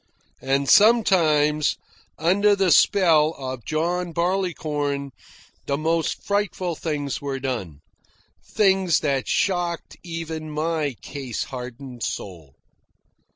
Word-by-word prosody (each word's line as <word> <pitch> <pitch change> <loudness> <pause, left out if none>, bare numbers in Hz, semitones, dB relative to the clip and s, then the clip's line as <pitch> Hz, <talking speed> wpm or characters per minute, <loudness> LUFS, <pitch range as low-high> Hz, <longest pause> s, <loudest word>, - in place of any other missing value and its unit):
And 135 +1 0
sometimes, 160 - +4 0.4
under 200 +6 +3
the 190 -3 +2
spell 160 -3 +4
of 130 -3 -6
John 170 +2 -1
Barleycorn, 155 -6 -1 0.6
the 140 - 0
most 165 +2 -1
frightful 200 -3 -1
things 145 -4 -3
were 140 -1 -3
done 105 - -4 0.6
things 190 -4 +2
that 140 -3 -1
shocked 175 -3 -1
even 165 -2 -6
my 155 -2 -1
case 135 -5 -5
hardened 125 -1 -8
soul. 85 -12 -6
155 Hz, 100 wpm, -23 LUFS, 140-175 Hz, 0.6 s, sometimes